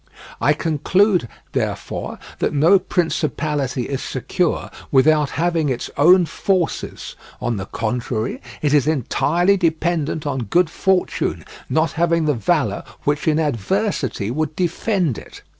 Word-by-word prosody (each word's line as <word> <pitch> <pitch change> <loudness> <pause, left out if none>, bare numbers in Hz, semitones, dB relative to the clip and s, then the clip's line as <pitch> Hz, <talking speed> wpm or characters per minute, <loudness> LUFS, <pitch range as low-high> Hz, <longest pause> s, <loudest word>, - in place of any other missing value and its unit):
I 145 +5 +4
conclude, 170 - +2 0.2
therefore, - - -3 0.2
that - - 0
no 165 +7 +5
principality 150 -7 -1
is 135 +2 -3
secure - - -1 0.2
without 150 +2 +4
having 165 -2 0
its 125 -2 -3
own 175 +5 +6
forces; 185 0 -2 0.2
on 120 -3 -1
the 95 0 -5
contrary, 115 0 -2 0.2
it 145 -1 +2
is 145 -2 +4
entirely 170 - +2
dependent 160 -3 0
on 135 -4 -2
good 170 - +2
fortune, 190 -1 0 0.2
not 160 +1 +2
having 170 -1 +1
the 150 - +2
valour 130 - 0 0.2
which 145 +2 0
in 155 -1 +3
adversity 145 - -1
would 155 +3 -2
defend 175 - 0
it. - - -14
155 Hz, 125 wpm, -20 LUFS, 135-175 Hz, 0.2 s, own